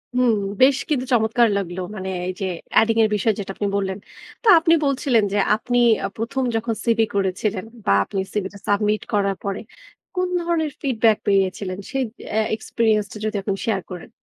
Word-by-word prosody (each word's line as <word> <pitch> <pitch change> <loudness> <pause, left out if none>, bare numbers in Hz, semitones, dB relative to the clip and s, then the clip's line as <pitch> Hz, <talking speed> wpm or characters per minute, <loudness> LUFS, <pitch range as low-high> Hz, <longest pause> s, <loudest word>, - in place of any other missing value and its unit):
হুম। 250 -2 +4 0.3
বেশ 270 +1 +6
কিন্তু 260 -4 0
চমৎকার 230 +1 +3
লাগলো। 180 -2 -4 0.2
মানে 190 -1 -5 0.2
এই 185 - -1
যে 195 - 0 0.4
adding 225 0 +1
এর 215 - +3
বিষয় 210 +2 +1
যেটা 195 -1 -4
আপনি 205 - -2
বললেন। 190 -1 -1 0.5
তো - - -2
আপনি 330 +1 +3
বলছিলেন 260 -5 +2
যে - - +1 0.2
আপনি 245 +3 -2 0.3
আ - - 0
প্রথম 235 +4 -2
যখন 225 0 -1
সিভি 225 -1 +3
করেছিলেন 195 0 -1 0.2
বা - - +2
আপনি 195 - -4
সিভি 205 -3 -1
টা 200 - -11
সাবমিট 210 +1 +1
করার 200 -1 +1
পরে 200 -1 -3 0.6
কোন 365 0 +1
ধরনের 330 -3 0
ফিডব্যাক 225 -5 +2
পেয়েছিলেন? 190 -1 +1
সেই 270 -1 0 0.3
এ্যা 220 0 +2
এক্সপেরিয়েন্স 220 -1 0
টা - - -8
যদি 215 0 -2
এখন 195 0 -2
শেয়ার 200 -5 0
করেন। 180 -2 -8
215 Hz, 180 wpm, -22 LUFS, 200-240 Hz, 0.6 s, বেশ